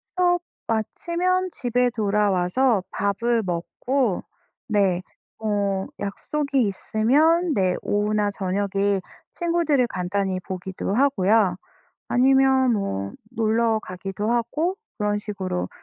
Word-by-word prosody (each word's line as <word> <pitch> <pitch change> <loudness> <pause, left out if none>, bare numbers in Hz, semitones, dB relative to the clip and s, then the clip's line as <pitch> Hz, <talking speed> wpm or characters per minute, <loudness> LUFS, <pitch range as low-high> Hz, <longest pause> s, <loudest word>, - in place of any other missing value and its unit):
수업 355 -1 +3 0.3
마치면 350 - 0
집에 245 0 +1
돌아와서 205 +1 +2
밥을 220 +3 0
먹고 200 +6 -1 0.5
네, 195 -4 +2 0.4
뭐 200 -2 -1
약속이 275 +7 -1
있으면 295 - +2
네, 185 -3 +2
오후나 210 0 +1
저녁에 200 0 0 0.3
친구들을 335 -7 +2
간단히 185 0 -2
보기도 190 +1 -4
하고요. 215 -7 +3 0.5
아니면 265 0 +4
뭐 100 - -2 0.2
놀러 225 0 +2
가기도 195 +4 -4
하고 305 - 0 0.2
그런 205 0 0
식으로 190 -4 -3
215 Hz, 225 characters per minute, -24 LUFS, 195-265 Hz, 0.5 s, 아니면